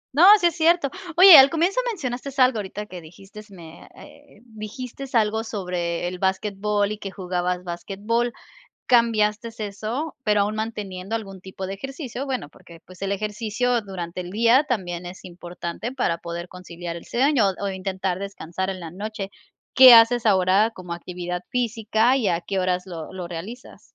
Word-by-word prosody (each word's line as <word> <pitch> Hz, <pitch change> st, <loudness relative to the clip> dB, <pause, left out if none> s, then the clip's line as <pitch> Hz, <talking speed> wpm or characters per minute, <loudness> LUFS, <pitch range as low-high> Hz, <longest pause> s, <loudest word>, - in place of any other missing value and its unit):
No, 340 Hz, +6 st, +7 dB
sí 355 Hz, -, 0 dB
es 340 Hz, -2 st, +2 dB
cierto. 330 Hz, -3 st, +2 dB, 0.3 s
Oye, 370 Hz, -1 st, +11 dB
al 265 Hz, +1 st, +7 dB
comienzo 345 Hz, -, +1 dB
mencionaste 270 Hz, -, -5 dB
algo 255 Hz, -3 st, +4 dB
ahorita 205 Hz, +1 st, -6 dB
que 185 Hz, -4 st, -10 dB
dijiste 195 Hz, +6 st, -14 dB
me 170 Hz, -4 st, -13 dB
eh, 285 Hz, -7 st, -17 dB
dijiste 245 Hz, +4 st, -8 dB
algo 220 Hz, 0 st, +2 dB
sobre 180 Hz, -5 st, -3 dB
el 180 Hz, 0 st, -6 dB
basquetbol 200 Hz, +2 st, 0 dB
y 215 Hz, -, -4 dB
que 195 Hz, -, -6 dB
jugabas 180 Hz, -1 st, -3 dB
basquetbol. 205 Hz, +7 st, -2 dB, 0.6 s
¿Cambiaste 225 Hz, -2 st, +2 dB
eso, 220 Hz, +9 st, -4 dB
pero 210 Hz, -3 st, +2 dB
aún 205 Hz, +1 st, 0 dB
manteniendo 210 Hz, -2 st, -4 dB
algún 195 Hz, -4 st, -7 dB
tipo 190 Hz, 0 st, -7 dB
de 195 Hz, -, -4 dB
ejercicio? 270 Hz, -, -6 dB
Bueno, 255 Hz, -, -4 dB
porque, 165 Hz, +1 st, -17 dB
pues, 185 Hz, 0 st, -16 dB
el 195 Hz, 0 st, -2 dB
ejercicio 215 Hz, +4 st, -1 dB
durante 180 Hz, -3 st, -6 dB
el 175 Hz, -, -8 dB
día 230 Hz, +7 st, +4 dB
también 180 Hz, -, -3 dB
es 180 Hz, +2 st, -11 dB
importante 175 Hz, +4 st, -7 dB
para 205 Hz, -11 st, -1 dB
poder 170 Hz, +1 st, -6 dB
conciliar 175 Hz, -2 st, -8 dB
el 170 Hz, -, -9 dB
sueño 255 Hz, -4 st, +2 dB
o, 200 Hz, -, -2 dB
intentar 190 Hz, -1 st, -3 dB
descansar 190 Hz, -2 st, -5 dB
en 190 Hz, -1 st, -5 dB
la 165 Hz, -2 st, -8 dB
noche. 200 Hz, +1 st, -6 dB, 0.5 s
¿Qué 255 Hz, -2 st, +10 dB
haces 230 Hz, +1 st, +5 dB
ahora 190 Hz, +2 st, +3 dB
como 180 Hz, -5 st, -8 dB
actividad 180 Hz, 0 st, -5 dB
física, 230 Hz, 0 st, +1 dB
y 245 Hz, -7 st, 0 dB
a 170 Hz, -1 st, 0 dB
qué 195 Hz, +2 st, -3 dB
horas 180 Hz, 0 st, 0 dB
lo 170 Hz, -3 st, -8 dB
lo 180 Hz, -2 st, -6 dB
realizas? 190 Hz, +9 st, -9 dB
205 Hz, 170 wpm, -23 LUFS, 180-235 Hz, 0.6 s, Oye